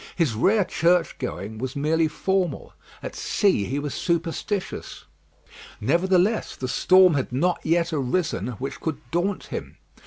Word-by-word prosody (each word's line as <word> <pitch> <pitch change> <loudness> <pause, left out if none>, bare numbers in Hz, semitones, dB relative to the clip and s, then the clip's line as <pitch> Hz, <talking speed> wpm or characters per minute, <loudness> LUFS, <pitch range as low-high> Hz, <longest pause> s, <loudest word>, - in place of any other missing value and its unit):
His 160 -9 +1
rare 195 - +3
churchgoing 160 - 0
was 130 +1 -4
merely 160 +3 +2
formal. 180 0 -1 0.3
At - - -5
sea 190 - +1
he 135 - -3
was 145 -1 -3
superstitious. 170 +3 -3 0.8
Nevertheless, 185 - +2
the 130 - -4
storm 185 +6 +5
had 135 -4 -1
never 170 +8 +2
yet 170 +1 +1
arisen 140 - -1
which 135 +2 -5
could 160 -3 -3
daunt 180 +3 0
him. - - -6
165 Hz, 130 wpm, -24 LUFS, 135-185 Hz, 0.8 s, storm